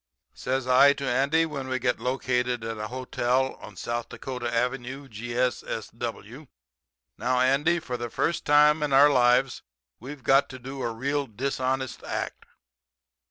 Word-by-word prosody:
"Says 130 0 -2
I 130 +3 +6
to 140 -1 -5
Andy, 140 +6 +2
when 140 -4 -5
we 130 0 -1
get 125 -2 0
located 125 -1 -1
at 115 -1 -5
a 105 - -3
hotel 130 +1 -1
on 105 - -11
South 120 +5 -4
Dakota 125 -3 -5
Avenue, 125 +3 -2
G.S.S.W. 120 +1 -4 0.7
'Now 125 +1 +1
Andy, 140 +7 +3
for 125 -6 -5
the 120 0 -5
first 170 +8 -1
time 150 +1 +5
in 145 -2 0
our 145 +2 +7
lives 125 0 +3 0.4
we've 135 +2 -9
got 135 +4 +4
to 130 - -8
do 135 +2 -8
a 120 - -1
real 140 +4 -2
dishonest 130 +2 -2
act. - - -4
130 Hz, 150 wpm, -26 LUFS, 120-135 Hz, 0.7 s, our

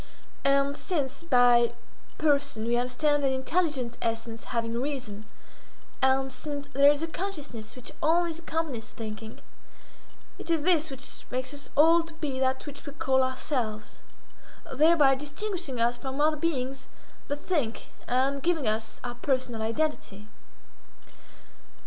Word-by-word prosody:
And 275 0 +3
since 295 -6 -2
by 245 -6 +5 0.4
person 280 -7 +1
we 235 +1 +2
understand 280 +4 +1
an 270 - +3
intelligent 265 -2 -1
essence 225 0 -3
having 230 0 -1
reason, 245 -7 -4 0.8
and 265 0 +3
since 285 +2 -5
there 280 +1 +7
is 295 +2 -1
a - - -1
consciousness 295 - -5
which 250 -1 -8
always 330 0 +2
accompanies 315 -9 -3
thinking, 220 0 -8 1.0
it - - -8
is 325 -3 +2
this 325 -3 +4
which 270 -1 -8
makes 255 +2 -1
us 285 0 -8
all 330 +3 +7
to 330 -1 -10
be 285 -5 -3
that 260 0 0
which 290 -1 -9
we 285 - -6
call 265 -2 +2
ourselves—thereby 260 +4 0
distinguishing 295 - -3
us 240 +1 +2
from 270 0 -5
other 305 +1 +4
beings 270 -4 -2 0.4
that 285 - -1
think, 290 -7 -2 0.2
and 270 +3 +1
giving 325 -6 +1
us 220 +1 -1
our 245 -1 -3
personal 250 -3 -1
identity. 225 -4 -2
270 Hz, 130 wpm, -28 LUFS, 245-305 Hz, 1.0 s, there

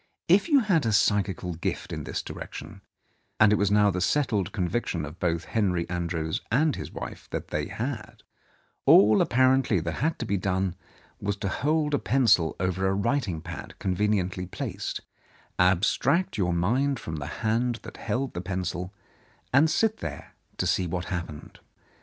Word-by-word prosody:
If 195 - +4
you 285 -3 +6
had 180 - +2
a 110 - +1
psychical 95 -2 +1
gift 80 - -4
in - - -5
this - - -3
direction 95 +5 -8 0.3
— - - -44
and 105 -1 +6
it - - +3
was 100 0 +2
now 105 0 +4
the 90 0 -2
settled 110 - +1
conviction 90 -4 -1
of 80 +4 -10
both 85 -1 0
Henry 90 -6 0
Andrews 85 -2 -2
and 150 +5 +3
his - - -7
wife - - -8
that - - -5
they - - -2
had 115 -2 -5 0.3
— - - -39
all 105 +1 +7
apparently 130 -4 +3
that 85 0 -3
had 160 +2 0
to - - -4
be 100 -2 0
done 95 -1 0 0.5
was 100 0 -1
to 100 -1 -3
hold 150 +7 0
a 145 - +3
pencil 115 -11 +3
over 95 +1 0
a 95 - +1
writing 100 - 0
pad - - -8
conveniently 95 -1 0
placed, - - -4 0.6
abstract 95 - +2
your 90 -4 +1
mind 120 +11 +1
from 80 -6 -5
the 70 -1 -5 0.2
hand 120 +2 +1
that - - -10
held 130 +2 -2
the 85 - -4
pencil, 90 -1 -3 0.6
and 150 +5 +5
sit 220 +5 +2
there - - -7 0.2
to - - 0
see 90 - +1
what 90 +1 -3
happened. 85 -4 -6
100 Hz, 170 wpm, -27 LUFS, 90-125 Hz, 0.6 s, all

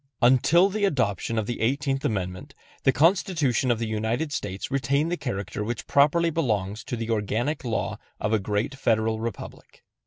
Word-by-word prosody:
Until 130 +9 +5
the 205 +1 -2
adoption 115 - 0
of 110 - 0
the 120 - -4
Eighteenth 135 +3 0
Amendment, 90 -4 -3 0.3
the 135 - +6
Constitution 160 - +2
of 120 - +3
the 115 - -2
United 110 +7 -2
States 95 -5 -4
retained 140 +4 +1
the - - +1
character 105 - -4
which 115 +1 -4
properly 165 +4 +3
belongs 105 - -1
to 125 - -3
the 115 0 -3
organic 115 +8 -1
law 115 -3 -2 0.2
of 105 +1 -1
a 110 - +3
great 105 +6 -1
Federal 110 -4 +1
Republic. 115 +1 -7
120 Hz, 165 wpm, -25 LUFS, 110-145 Hz, 0.3 s, the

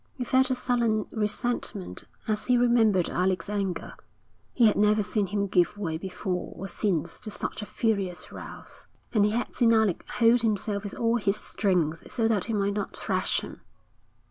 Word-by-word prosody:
He 255 - -3
felt 260 +1 +3
a 260 - +1
sullen 235 -4 +1
resentment 215 -2 -2 0.2
as 215 -1 -1
he 250 -1 +4
remembered 225 -7 +4
Alec's 185 +1 0
anger. 195 -3 -2 0.6
He 240 - +3
had 215 - +5
never 210 +1 +3
seen 205 0 -1
him 200 +1 -1
give 185 +1 +2
way 165 -6 -3
before 185 0 -4
or 195 - -6
since 175 -4 -1
to - - -6
such 210 - -3
a 210 - -6
furious 195 -5 -1
wrath, - - -11 0.3
and 215 -3 +4
he 210 - +4
had 230 +3 -2
seen 235 -2 +3
Alec 220 -5 +2
hold 235 +1 +4
himself 210 -2 -1
with 200 - -6
all 230 0 +1
his 205 -2 +1
strength 175 -7 -1
so 225 -2 +1
that 215 -4 +1
he 225 - -3
might 200 -1 +1
not 205 -1 -4
thrash - - 0
him. - - -10
210 Hz, 180 wpm, -27 LUFS, 195-230 Hz, 0.6 s, had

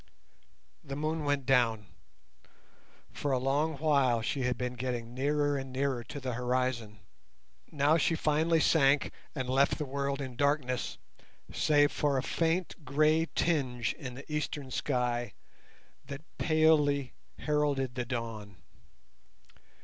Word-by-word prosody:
The 140 -2 -6
moon 155 +1 -2
went 145 -2 0
down. 115 -5 +2 1.3
For 145 - -3
a 130 - +3
long 140 +4 0
while 135 -6 +2
she 135 +4 -1
had 125 -1 0
been 125 0 -3
getting 120 -2 -4
nearer 145 +2 +1
and 135 -1 -7
nearer 130 -2 -1
to 145 - -7
the 130 -2 -3
horizon. 125 -4 -1 0.7
Now 150 +1 +3
she 165 +1 +2
finally 160 +2 +2
sank 140 -3 +3 0.2
and 130 -3 -3
left 135 +2 +2
the 150 - -3
world 140 0 -2
in 130 -3 -5
darkness 140 -2 0 0.6
save 145 -1 +3
for 145 -2 +1
a 130 - 0
faint 165 0 -1
grey 155 +4 +2
tinge 130 -8 0
in 130 -5 -8
the 140 - -10
eastern 145 -3 -3
sky 120 -5 -1 0.7
that 140 +1 -7 0.2
palely 150 -5 +3 0.2
heralded 145 -4 0
the 125 0 -2
dawn. 115 -4 -5
140 Hz, 130 wpm, -30 LUFS, 125-150 Hz, 1.3 s, a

